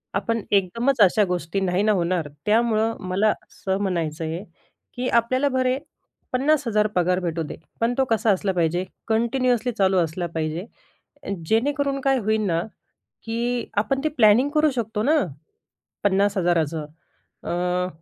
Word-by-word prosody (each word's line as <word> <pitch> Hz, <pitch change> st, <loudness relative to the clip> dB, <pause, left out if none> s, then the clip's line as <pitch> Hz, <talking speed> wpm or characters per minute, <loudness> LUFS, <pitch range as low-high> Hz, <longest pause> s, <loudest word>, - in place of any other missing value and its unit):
आपण 230 Hz, +3 st, 0 dB
एकदमचं 220 Hz, +6 st, +3 dB
अशा 205 Hz, +3 st, +4 dB
गोष्टी 180 Hz, +1 st, -2 dB
नाही 185 Hz, 0 st, +1 dB
ना 215 Hz, -, +3 dB
होणार. 175 Hz, -4 st, 0 dB, 0.2 s
त्यामुळं 225 Hz, 0 st, +2 dB
मला 200 Hz, +4 st, +2 dB
असं 190 Hz, 0 st, -3 dB
म्हणायचं 165 Hz, -5 st, -2 dB
आहे 165 Hz, +4 st, -4 dB, 0.5 s
की 250 Hz, +1 st, -3 dB
आपल्याला 255 Hz, +4 st, +2 dB
भले 255 Hz, -1 st, +1 dB, 0.6 s
50,000 255 Hz, -6 st, +2 dB
पगार 180 Hz, +1 st, +2 dB
भेटू 170 Hz, -2 st, -2 dB
दे. -, -, -7 dB, 0.3 s
पण 235 Hz, +2 st, +2 dB
तो 265 Hz, -, +3 dB
कसा 220 Hz, -1 st, +3 dB
असला 190 Hz, 0 st, 0 dB
पाहिजे? 175 Hz, +1 st, 0 dB, 0.2 s
कंटिन्युअसली 245 Hz, +2 st, +1 dB
चालू 195 Hz, -3 st, +2 dB
असला 175 Hz, +1 st, 0 dB
पाहिजे. 160 Hz, +3 st, -2 dB, 0.6 s
अ, -, -, -7 dB, 0.2 s
जेणेकरून 275 Hz, +4 st, +1 dB
काय 270 Hz, 0 st, +2 dB
होईल 220 Hz, 0 st, 0 dB
ना 165 Hz, -2 st, +1 dB, 0.6 s
की 235 Hz, +1 st, -2 dB
आपण 220 Hz, +6 st, +1 dB
ते 310 Hz, -, +2 dB
प्लॅनिंग 225 Hz, +5 st, +5 dB
करू 305 Hz, 0 st, +4 dB
शकतो 225 Hz, -3 st, -2 dB
ना. 305 Hz, +6 st, +3 dB, 0.9 s
50,000 190 Hz, -4 st, +2 dB
चं 155 Hz, 0 st, -5 dB, 0.6 s
अ, 180 Hz, +1 st, -1 dB
210 Hz, 145 wpm, -23 LUFS, 180-240 Hz, 0.9 s, प्लॅनिंग